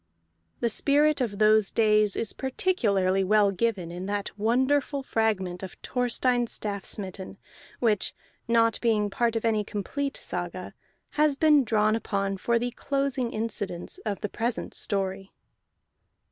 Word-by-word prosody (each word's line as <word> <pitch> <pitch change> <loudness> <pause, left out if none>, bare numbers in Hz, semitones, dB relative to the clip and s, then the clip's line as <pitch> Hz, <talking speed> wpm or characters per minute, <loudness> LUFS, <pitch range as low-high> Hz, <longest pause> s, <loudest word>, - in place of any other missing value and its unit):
The 235 - +2
spirit 290 +5 +2
of 215 -5 -2
those 215 -1 +4
days 215 -2 +3
is 225 - -2
particularly 205 - +1
well 205 +1 +4
given 190 -4 -1
in 180 +2 -6
that 205 0 -3
wonderful 265 +6 +1
fragment 200 -7 -1
of 190 -2 -8
Thorstein 245 0 +1
Staffsmitten 195 -2 -3 0.4
which 215 -5 +1 0.3
(not 230 -1 +2
being 215 -3 +1
part 235 +2 0
of 225 - -1
any 215 -2 +2
complete 275 +8 -3
saga) - - -5 0.5
has 300 -2 +4
been 300 -1 +5
drawn 215 -1 +2
upon 195 -3 -2
for 235 +4 +1
the 245 +1 -2
closing 275 -2 -1
incidents 210 - -3
of 205 - -4
the 210 - -2
present 235 +2 -3
story. 195 -1 -2
220 Hz, 130 wpm, -27 LUFS, 200-245 Hz, 0.5 s, been